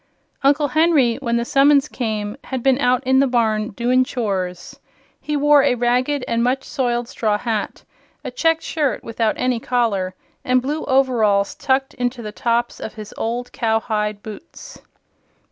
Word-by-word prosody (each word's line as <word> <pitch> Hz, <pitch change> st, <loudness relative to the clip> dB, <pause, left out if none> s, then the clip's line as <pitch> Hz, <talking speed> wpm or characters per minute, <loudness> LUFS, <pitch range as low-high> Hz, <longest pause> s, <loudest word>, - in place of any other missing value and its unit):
Uncle 285 Hz, +1 st, +3 dB
Henry, 300 Hz, -6 st, +3 dB
when 235 Hz, -4 st, -1 dB
the 235 Hz, -, -1 dB
summons 280 Hz, +2 st, +4 dB
came, 215 Hz, -5 st, -3 dB
had 260 Hz, -3 st, -4 dB
been 270 Hz, -1 st, +3 dB
out 255 Hz, -1 st, +2 dB
in 265 Hz, +1 st, +4 dB
the 275 Hz, -, +4 dB
barn 220 Hz, -3 st, +1 dB
"doin' 245 Hz, +4 st, +1 dB
chores." 195 Hz, -8 st, -4 dB, 0.4 s
He 300 Hz, -1 st, -2 dB
wore 295 Hz, 0 st, +5 dB
a 270 Hz, -2 st, +2 dB
ragged 250 Hz, +3 st, 0 dB
and 230 Hz, 0 st, 0 dB
much 260 Hz, +2 st, 0 dB
soiled 240 Hz, -4 st, -2 dB
straw 215 Hz, -5 st, -1 dB
hat, 220 Hz, -2 st, -3 dB, 0.4 s
a -, -, -5 dB
checked 325 Hz, -8 st, +1 dB
shirt 295 Hz, -5 st, -1 dB
without 225 Hz, -1 st, -1 dB
any 250 Hz, -2 st, 0 dB
collar 215 Hz, -7 st, -1 dB, 0.3 s
and 255 Hz, 0 st, +3 dB
blue 290 Hz, +5 st, -3 dB
overalls 230 Hz, -7 st, +2 dB
tucked 265 Hz, 0 st, 0 dB
into 245 Hz, -1 st, -3 dB
the 210 Hz, -, -6 dB
tops 235 Hz, +2 st, -1 dB
of 215 Hz, -, -7 dB
his 215 Hz, -2 st, -9 dB
old 240 Hz, +2 st, -3 dB
cowhide 215 Hz, -2 st, -1 dB
boots. 215 Hz, +9 st, -11 dB
245 Hz, 160 wpm, -20 LUFS, 220-270 Hz, 0.4 s, wore